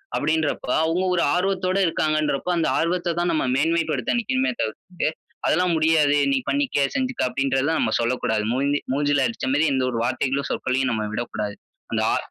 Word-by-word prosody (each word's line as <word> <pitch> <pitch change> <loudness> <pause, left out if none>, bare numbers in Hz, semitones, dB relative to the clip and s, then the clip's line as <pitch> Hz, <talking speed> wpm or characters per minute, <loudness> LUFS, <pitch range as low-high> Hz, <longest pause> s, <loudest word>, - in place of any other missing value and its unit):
அப்டின்றப்ப 155 0 0 0.2
அவங்க 165 +3 0
ஒரு 175 - +2
ஆர்வத்தோட 185 0 0
இருக்காங்கன்றப்ப, 155 -2 0
அந்த 165 - +1
ஆர்வத்த 175 +1 0
தான் 175 0 +1
நம்ம 155 - 0
மேன்மைப்படுத்த 165 - 0
நினைக்கணுமே 260 +3 0
தவிர்த்து, 175 - -3 0.4
அதெல்லாம் 180 +1 +2
முடியாது 155 -2 +3 0.2
நீ 275 - +3
பண்ணிக்க, 280 - +1
செஞ்சுக்க, 260 -2 -1
அப்டின்றத 135 +1 0
நம்ம 110 - 0
சொல்லக்கூடாது. 115 -3 0
மூஞ்சி 140 +3 0
மூஞ்சில 145 0 +2
அடிச்ச 230 - -4
மாரி, 150 +3 +3
எந்த 130 -1 +1
ஒரு 115 - -2
வார்த்தைகளும் 130 +3 -1
சொற்களையும் 130 0 0
நம்ம 110 -2 -1
விடக்கூடாது. 105 -3 -4 0.3
அந்த - - 0
அ - - +2
155 Hz, 155 wpm, -23 LUFS, 130-175 Hz, 0.4 s, முடியாது